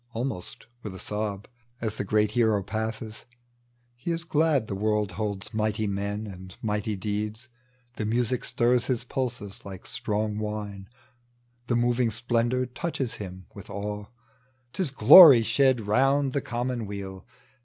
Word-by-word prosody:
" - - -34
almost 115 -6 -4 0.2
with 100 -4 -7
a - - -9
sob, 105 0 -4 0.3
As 110 -2 -3
the - - -1
great 105 +1 +2
hero 110 -3 +2
passes; 110 +1 -4 0.7
he 120 +7 -7
is 165 0 -1
glad 155 -5 +2
The 105 - -5
world 105 0 0
holds 100 0 -4
mighty 110 0 0
men 100 +1 -2
and 95 -2 -10
mighty 105 0 -2
deeds; 105 +4 -4 0.5
The 105 - -2
music 120 +2 0
stirs 120 0 +1
his 125 -3 -1
pulses 120 -6 -4
like 95 -2 -9
strong 105 0 -1
wine, 105 -2 -5 0.8
The 120 - +1
moving 120 0 +2
splendor 120 +2 0
touches 130 -1 -3
him 95 -2 -8
with - - -11
awe 105 +1 -5 0.3
— 130 -1 -40
Tis 185 -6 0
glory 140 -2 +10
shed 130 0 +3
around 135 +6 +2
the 140 - 0
common 120 -2 -3
weal. 95 -2 -7
110 Hz, 150 wpm, -27 LUFS, 105-125 Hz, 0.8 s, glory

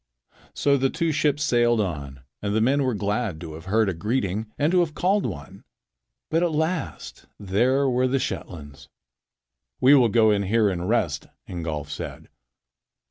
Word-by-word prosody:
So 140 -1 +2
the 135 0 +1
two 165 +2 -1
ships 150 -1 +1
sailed 120 -4 +3
on, 70 -9 -4 0.2
and 100 0 -2
the - - +3
men 135 +6 +2
were 130 -4 0
glad 105 -3 -2
to 80 -3 -7
have 80 +2 -10
heard 110 +3 +2
a 95 - 0
greeting 105 +3 -2
and 150 +3 +1
to 180 - +4
have 160 -3 0
called 195 +4 +1
one. 75 +7 -9 0.7
But 165 +1 +2
at 175 -1 +1
last 160 +3 -3
there 125 +8 +1
were 130 0 +2
the 135 +2 +1
Shetlands. 75 - -6 0.9
"We 130 +3 +6
will 125 -5 +5
go 110 0 +4
in 100 -1 +2
here 105 +2 +2
and 90 +1 -3
rest," 85 -11 0 0.2
Ingolf 80 -4 -5
said. - - -7
115 Hz, 170 wpm, -24 LUFS, 95-140 Hz, 0.9 s, We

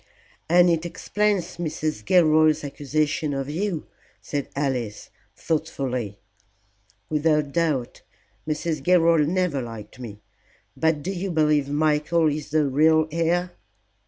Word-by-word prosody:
"And 175 +1 +6
it 165 -1 0
explains 205 +2 -1
Mrs. 155 -7 -3
Gilroy's 155 - +4
accusation 145 +1 -1
of 135 +1 -3
you," 175 0 -2 0.3
said 145 -2 -4
Alice, 130 -7 -3 0.2
thoughtfully. 130 -9 -3 0.9
"Without 150 0 +1
doubt. 150 -7 -1 0.5
Mrs. 155 +1 -2
Gilroy 170 -3 +4
never 175 -4 0
liked 115 -1 -9
me. 105 -4 -9 0.5
But 160 -2 0
do 190 - -2
you 195 +1 -3
believe 150 -4 +2
Michael 155 +2 +2
is 150 +1 -4
the 155 0 +2
real 155 +3 +3
heir?" 170 +2 0
155 Hz, 115 wpm, -24 LUFS, 140-165 Hz, 0.9 s, And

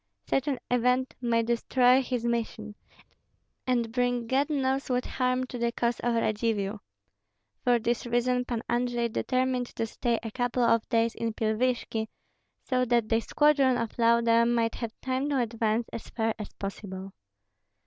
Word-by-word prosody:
Such 270 +2 0
an 275 -3 0
event 250 +1 +2
might 230 -2 +1
destroy 245 +2 +3
his 250 -2 -3
mission, 225 -2 -2 0.9
and 240 -3 +1
bring 245 -1 0
God 270 +5 +1
knows 270 -2 0
what 250 0 0
harm 255 0 0
to 250 -1 -6
the 235 0 +1
cause 235 0 -1
of 240 0 0
Radzivill. 215 -2 0 0.8
For 245 -1 +4
this 235 +1 -1
reason 250 +1 +1
Pan 235 -2 -3
Andrei 240 -1 0
determined 255 +1 0
to 230 - -1
stay 235 +1 -1
a 225 - -5
couple 245 +1 0
of 230 -1 +2
days 230 -1 +2
in 230 -1 -3
Pilvishki, 225 0 0 0.6
so 255 -1 +1
that 235 -2 +1
the 225 - +3
squadron 275 0 +3
of 230 -2 -3
Lauda 230 0 +4
might 230 -1 +1
have 230 -2 -6
time 260 +2 -1
to 285 - +1
advance 230 -1 0
as 230 - -7
far 225 -1 -1
as 210 - -6
possible. 195 -1 -6
235 Hz, 160 wpm, -28 LUFS, 230-250 Hz, 0.9 s, For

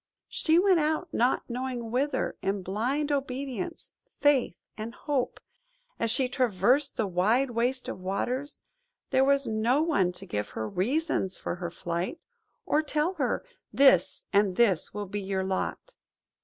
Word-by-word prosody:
She 320 0 +2
"went 370 -1 +5
out 315 +3 0
not 245 +3 +2
knowing 245 -2 -4
whither,"–in 215 -7 -1
blind 255 +11 -1
obedience, 275 +4 -3 0.3
faith, 290 -4 +3 0.2
and 225 +1 -6
hope. 275 -4 -2 0.6
As 230 - +1
she 255 +3 +2
traversed 250 +3 +2
the 220 - +1
wide 215 +8 +2
waste 245 +2 0
of - - -5
waters, 245 +10 -3 0.5
there 260 - +4
was 275 0 +3
no 230 +6 +2
one 200 - +2
to 190 - -10
give 105 - -3
her 110 - -2
reasons 225 - 0
for - - -4
her 175 -1 -4
flight, 175 - -3 0.5
or 305 - +2
tell 305 +3 0
her, 255 - 0 0.3
"This 190 -10 +4
and 200 -2 +3
this 200 -7 +3
will 205 0 -4
be 205 +1 -4
your 190 -1 -1
lot." 190 - -3
245 Hz, 145 wpm, -28 LUFS, 195-280 Hz, 0.6 s, went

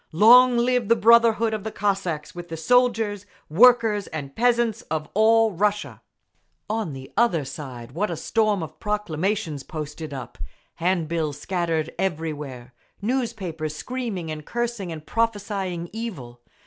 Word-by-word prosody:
Long 245 +7 +7
live 245 -1 +1
the 230 - +6
brotherhood 230 0 +4
of 215 -2 -3
the 220 - -4
Cossacks 190 -8 -2
with 175 0 -8
the 165 - -5
soldiers, 225 -1 +2 0.2
workers 225 +1 +5
and 140 -3 -7
peasants 235 -2 +2
of 155 -1 -2
all 225 +1 +4
Russia! 205 +3 -1 0.7
On 215 -7 -2
the 135 0 -10
other 175 -11 +2
side, 130 -4 -8
what 195 +9 -1
a 170 - -4
storm 215 -3 +1
of 160 - -9
proclamations 195 -5 -2
posted 155 0 -7
up, 125 -3 -8 0.4
hand 175 -1 0
bills 155 -3 -2
scattered 165 -2 -2
everywhere, 150 -8 -4 0.3
newspapers—screaming 200 - -3
and 155 -1 -6
cursing 235 -3 -3
and 155 -1 -8
prophesying 200 -6 -2
evil. 145 - -7
195 Hz, 135 wpm, -24 LUFS, 155-225 Hz, 0.7 s, Long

